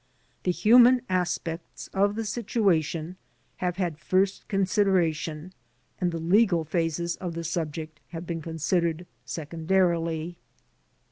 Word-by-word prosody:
The 180 - +3
human 245 +5 +6
as 180 -1 +1
pects 165 0 -7
of 200 +1 +2
the 225 0 -3
situation 185 -7 0 0.4
have 180 -1 -2
had 175 -5 -2
first 190 +3 0
consideration 185 -4 0 0.5
and 180 -1 +1
the 165 - -3
legal 175 +1 +3
phases 170 +1 -1
of 175 -3 -5
the 170 - -4
subject 155 -2 -4
have 165 0 -7
been 165 -1 -4
considered 165 +1 -1 0.2
secondarily. 165 +3 -1
170 Hz, 120 wpm, -27 LUFS, 165-190 Hz, 0.5 s, human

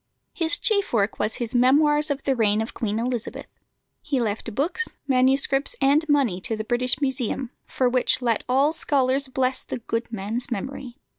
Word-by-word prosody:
His 335 +3 0
chief 405 - 0
work 210 -2 0
was 210 +1 0
his 235 -1 -4
Memoirs 295 +5 +4
of 280 -1 -2
the 270 - +1
Reign 215 -3 +2
of 225 - -8
Queen 215 -2 -2
Elizabeth. 240 0 -3 0.6
He 280 -3 -1
left 220 -1 -3
books, 360 +11 -1 0.2
manuscripts, 270 +1 +2
and 295 +3 +2
money 260 -11 +2
to 220 +3 -2
the 215 - -3
British 245 +2 0
Museum, 260 -2 -2 0.2
for 255 - 0
which 250 0 +2
let 235 -4 0
all 275 +4 +3
scholars 275 -3 +1
bless 260 0 -1
the - - -5
good 230 0 -4
man's 220 +4 -3
memory. 250 +2 -5
255 Hz, 170 wpm, -24 LUFS, 230-280 Hz, 0.6 s, Memoirs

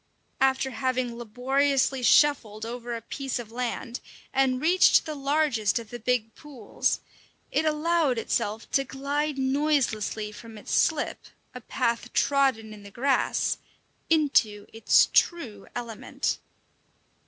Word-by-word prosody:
After 265 0 +2
having 250 0 -1
labouriously 265 +3 0
shuffled 230 -6 +3
over 240 0 -5
a 230 - -7
piece 270 +2 -4
of 235 -3 -8
land, 245 0 -4 0.3
and 265 -1 +2
reached 350 +6 +4
the 310 - -4
largest 275 -7 +1
of 230 -2 -6
the 240 - -6
big 225 -1 -1
pools, 265 -8 -3 0.5
it 315 - +1
allowed 310 -3 +1
itself 220 -1 -2
to 275 - +2
glide 280 +2 -2
noiselessly 265 -6 0
from 225 +1 -11
its 210 - -6
slip 310 -2 +1 0.3
a 250 - -8
path 235 0 -2
trodden 265 -6 +1
in 210 - -12
the 200 - -11
grass 265 +6 0 0.5
into 270 -10 +2
its 225 - +4
true 240 - +1
element. 235 -3 -3
255 Hz, 125 wpm, -26 LUFS, 225-280 Hz, 0.5 s, reached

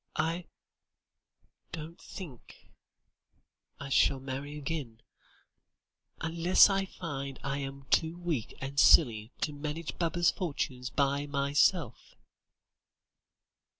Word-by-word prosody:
I 165 +3 -1 1.3
don't 160 +2 -8
think 160 - -11 1.1
I 140 - -6
shall 135 0 +3
marry 135 +2 -5
again 135 -6 -5 1.2
unless 170 +4 +5
I 195 0 +1
find 140 -8 -6
I 140 +1 -2
am 135 0 -6
too 160 +1 +2
weak 165 -10 -3
and 140 +1 -3
silly 115 -8 +5
to 150 - -1
manage 150 +3 -5
Baba's 170 0 +2
fortune 140 -7 -3
by 140 0 +1
myself." 140 - +1
145 Hz, 95 wpm, -30 LUFS, 135-165 Hz, 1.3 s, unless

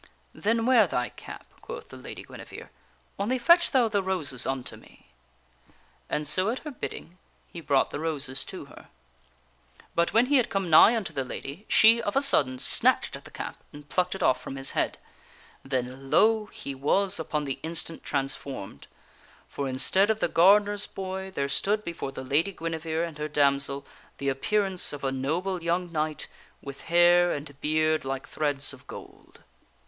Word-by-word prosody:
"Then 225 +2 0
wear 240 -5 +5
thy 125 -6 -1
cap," - - -11 0.2
quoth - - -8
the - - -11
Lady - - -9
Guinevere. - - -11 0.3
" 65 - -34
Only 230 +6 0
fetch 340 +8 +5
thou 255 -4 +3
the 205 -2 0
roses 180 -9 -2
unto 130 -2 -3
me." - - -19 1.0
And 150 0 -1
so 185 +7 +2
at 240 - -1
her 300 - -4
bidding, 185 -7 -7 0.3
he 170 - -7
brought 140 -3 +2
the - - -4
roses 145 -4 -2
to - - -8
her. - - -15 1.1
But 170 0 +1
when 230 +2 +4
he 285 +2 +3
had 250 - +2
come 195 -4 -2
nigh 210 +9 +8
unto 190 -8 -4
the 135 -2 -1
lady, 140 +9 -7
she, 230 +1 +6
of 205 - -3
a 275 - +4
sudden, 130 - +3
snatched - - +2
at - - -11
the - - -11
cap - - -6
and 145 0 -12
plucked 180 +2 0
it - - -4
off 130 - +3
from - - -7
his 135 0 0
head. - - -1 0.7
Then, 130 0 -4
lo! 220 +3 +4
he 140 - -7
was 180 +8 +1
upon 150 -1 -2
the 135 -2 -3
TheLad?fGui. - - -7
instant 165 0 -5
transformed; 135 - -4 0.6
for 140 -1 -4
instead 135 +11 +2
of 220 -1 +1
the - - +1
gardener's 205 +3 +4
boy 190 0 -5
there 185 -7 -3
nevere - - -2
discovers 140 - -1
stood 210 +2 +2
before 170 -6 -5
the 130 - -7
Lady 150 +9 +1
Guinevere 165 -1 -3
and 160 -3 -9
her 150 - -2
damsel 140 -1 +1 0.3
the 140 - -1
appear 205 +10 +1
^f^taiL - - -1
ance 180 -4 -2
of 145 - -7
a 135 - 0
noble 170 +8 -2
young 170 +1 -1
knight 155 -1 -2 0.3
with 140 -1 -9
hair 175 +1 +5
and 145 -1 -6
beard 155 +1 +1
like 135 0 -4
threads 145 -2 -2
of 135 - -15
gold. - - -12
160 Hz, 190 wpm, -27 LUFS, 140-195 Hz, 1.1 s, nigh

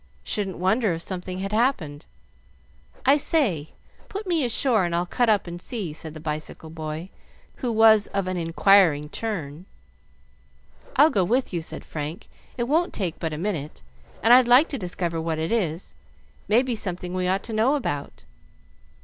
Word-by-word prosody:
Shouldn't 195 -3 -2
wonder 195 +2 +1
if 165 +1 -3
something 185 -1 -5
had 195 +1 -4
happened. 210 - 0 1.0
I 275 +2 +6
say, 230 - 0 0.4
put 405 +2 -5
me 340 -5 +1
ashore, 240 -3 +3
and 170 -1 -1
I'll 175 +1 0
cut 240 +6 +1
up 210 -3 +3
and 175 0 -7
see," 200 -10 -4
said 160 0 -7
the - - -7
bicycle 155 +1 -6
boy, 160 +2 -6 0.5
who 250 -3 -2
was 220 -2 +5
of 195 -1 -2
an 185 - -2
inquiring 165 -3 +3
turn. 175 -5 -5 1.3
"I'll 300 +4 +6
go 195 - +2
with 245 +4 0
you," 170 - -1
said 160 - -7
Frank; 155 +3 -6 0.3
"it 240 - 0
won't 320 +8 +1
take 180 -5 -3
but 160 -2 -2
a 150 - -4
minute, 155 - -4 0.4
and 230 +3 +7
I'd 250 -1 +7
like 250 +6 +6
to 275 - -4
discover 175 -3 -3
what 160 -1 -2
it 160 +4 -2
is. 180 -7 -1 0.5
May 230 +4 +4
be 255 -3 -2
something 180 -3 -4
we 185 0 -1
ought 190 +2 0
to 225 - -6
know 230 +7 +3
about." 145 - -4
185 Hz, 175 wpm, -24 LUFS, 165-230 Hz, 1.3 s, and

